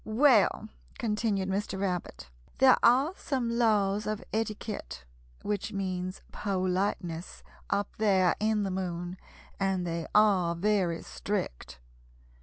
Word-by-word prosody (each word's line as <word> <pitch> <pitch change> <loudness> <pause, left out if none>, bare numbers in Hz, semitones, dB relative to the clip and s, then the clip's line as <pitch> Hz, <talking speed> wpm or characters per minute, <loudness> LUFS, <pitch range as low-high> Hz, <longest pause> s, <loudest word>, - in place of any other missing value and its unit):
"Well," 225 -1 +3 0.3
continued 210 -3 0
Mr. 195 0 -2
Rabbit, 180 - -3 0.3
"there 260 -1 +7
are 265 +8 +4
some 255 -9 -2
laws 210 -3 +2
of 215 -1 -3
etiquette 210 - -4 0.4
which 205 +1 -2
means 185 -1 -3
politeness 185 -3 -2 0.3
up 200 0 -1
there 190 -5 +3
in 215 -1 +1
the 195 - -2
Moon, 180 -1 -4 0.4
and 190 -2 0
they 170 -1 -3
are 195 -5 +4
very 180 -2 0
strict. 60 0 -4
195 Hz, 110 wpm, -29 LUFS, 180-215 Hz, 0.4 s, there